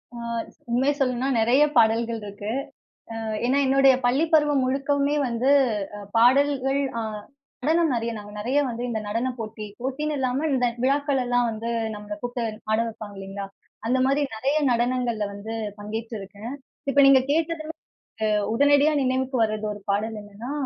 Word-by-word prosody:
அ, - - -7 0.5
உண்மைய 265 +4 +2
சொல்லணும்னா, 255 -1 0
நிறைய 240 +6 +4
பாடல்கள் 230 0 +3
இருக்கு. 205 +1 -7 0.7
அ - - -5 0.3
ஏன்னா, 265 +3 +2
என்னுடைய 270 0 +5
பள்ளி 265 +6 +3
பருவம் 295 -3 +4
முழுக்கவுமே 280 +2 +1
வந்து 240 +3 +1 0.5
அ - - -7 0.2
பாடல்கள், 270 +3 +3 0.2
அ - - -1 0.6
நடனம் 325 -1 +3
நெறய 230 0 -1
நாங்க 205 -1 -9
நெறய 245 +7 0
வந்து 235 0 -5
இந்த 220 -2 -2
நடன 230 +5 -1
போட்டி, 215 -1 -6
போட்டின்னு 295 +4 -2
இல்லாம 265 +3 0
இந்த 250 -2 +2 0.2
விழாக்கள் 280 +1 +2
எல்லா 245 0 +1
வந்து 225 +1 -5 0.3
நம்மள 210 0 -7
கூப்பிட்டு 245 0 -3 0.3
ஆட 220 - +3
வப்பாங்க 215 -2 -9
இல்லைங்களா! 195 +1 -6 0.4
அந்த 250 +3 +2
மாதிரி 275 +2 +2
நிறைய 270 +6 0 0.2
நடனங்கள்ல 240 -2 0
வந்து 215 +3 -6 0.2
பங்கேற்றிருக்கேன். 215 +1 -6 0.4
இப்ப 280 - -1
நீங்க 275 -1 +7
கேட்டது 325 0 0 0.9
உடனடியா 285 +4 +4
நினைவுக்கு 260 0 0
வரது 215 -1 -1
ஒரு 205 - -10
பாடல் 215 +2 -1
என்னன்னா, 205 +5 -8
245 Hz, 145 wpm, -24 LUFS, 220-275 Hz, 0.9 s, நீங்க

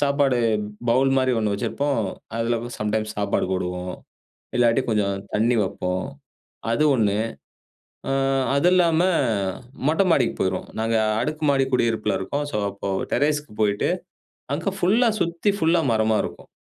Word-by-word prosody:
சாப்பாடு 140 -3 +2 0.5
பவுல் 130 +3 +3
மாரி 130 -1 +2
ஒண்ணு 105 -2 0
வச்சிருப்போம். 140 +6 -1 0.4
அதுலவும் 120 +1 -2
சம்டைம்ஸ் 110 +1 -1
சாப்பாடு 100 -2 0
போடுவோம், 90 0 -3 0.7
இல்லாட்டி, 120 +1 +4
கொஞ்சம் 100 -3 +1 0.2
தண்ணி 115 +3 +2
வப்போம், 90 0 -2 0.7
அது 135 +6 +2
ஒண்ணு. 105 -3 +2 0.9
ஆ - - +1 0.4
அது 140 +6 +3
இல்லாம 170 -3 +4 0.9
மொட்ட 160 +5 +3
மாடிக்கு 125 -6 +2
போயிருவோம். 95 -1 -1
நாங்க 115 0 +1 0.2
அடுக்கு 155 +5 -3
மாடி 135 -1 +2
குடியிருப்புல 110 -5 +1
இருக்கோம். 145 +10 -2
ஸோ - - -1
அப்போ 100 0 -5 0.2
டெரேஸ்க்கு 150 -5 0
போயிட்டு, 100 -1 +1 0.6
அங்க 170 +6 -2
ஃபுல்லா 225 +7 +3
சுத்தி 170 +5 +1
ஃபுல்லா 165 -1 +3
மரமா 110 0 +2
இருக்கும். - - -8
120 Hz, 130 wpm, -23 LUFS, 105-145 Hz, 0.9 s, இல்லாட்டி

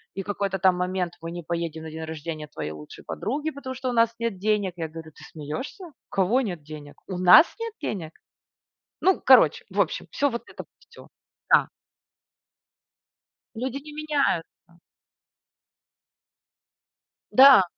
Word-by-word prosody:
и 195 - -3
какой-то 200 -1 -2
там 185 0 +4
момент: 180 -1 -2
"Мы 165 0 -6
не 175 0 -6
поедем 165 -1 -4
на 160 - -7
день 160 +1 -6
рождения 155 -1 -6
твоей 75 - -6
лучшей 75 -1 -11
подруги, 290 +7 -3
потому 270 -3 -7
что 260 0 -3
у - - -2
нас 230 -1 +3
нет 230 -4 -2
денег". 205 -2 0
Я 165 -2 -4
говорю: 160 0 -10
"Ты - - -16
смеешься? 155 - -6
У 305 -8 -18
кого 195 +7 +2
нет 180 - -4
денег? 150 -1 -10
У 185 - -4
нас 185 - +8
нет 460 -1 -4
денег?". 165 -7 -4 0.9
Ну, 380 0 +3
короче, - - +6
в - - -1
общем, - - 0
всё 285 0 +1
вот 235 -1 -4
это, - - -9 0.2
всё. - - -15 0.4
Да. - - +5 1.9
Люди 255 +3 -3
не 300 +1 -11
меняются. 280 - -2 2.5
Да. 265 -5 +9
190 Hz, 150 wpm, -25 LUFS, 165-260 Hz, 2.5 s, Да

